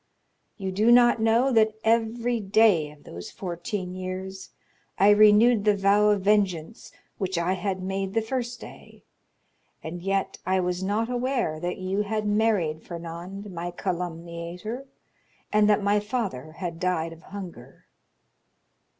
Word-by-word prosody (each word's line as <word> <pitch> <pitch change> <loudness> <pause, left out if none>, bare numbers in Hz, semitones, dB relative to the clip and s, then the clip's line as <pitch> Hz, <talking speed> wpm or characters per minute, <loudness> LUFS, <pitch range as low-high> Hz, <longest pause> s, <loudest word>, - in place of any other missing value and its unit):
You 190 -3 -3
do 215 +5 +3
not 240 -1 +6
know 230 +4 +3
that 220 -2 +3
every 230 +1 +1
day 200 -6 +3
of 150 0 -17
those 85 +1 -9
fourteen 180 +1 -5
years 185 +1 -6 0.5
I 200 +2 +6
renewed 215 +2 +6
the 210 -1 +3
vow 200 +2 +4
of 205 -2 +2
vengeance 200 -2 0 0.3
which 190 -3 -2
I 170 +2 +1
had 190 -1 -3
made 195 +1 -3
the 225 - +3
first 240 +1 -3
day; - - -13 0.8
and 170 +2 -6
yet 195 +1 -1
I 185 +1 +1
was 180 0 -1
not 205 +4 0
aware 245 - -1
that 175 +2 -3
you 190 +2 -1
had 215 +1 -2
married 205 -7 +1
Fernand, 175 +4 -8
my 175 0 -4
calumniator, 175 +6 -5 0.7
and 210 0 +4
that 210 -1 +3
my 205 +1 +3
father 205 - -4
had 170 -1 -5
died 165 -2 -1
of 165 - -15
hunger!" 190 -2 -10
195 Hz, 140 wpm, -26 LUFS, 175-215 Hz, 0.8 s, not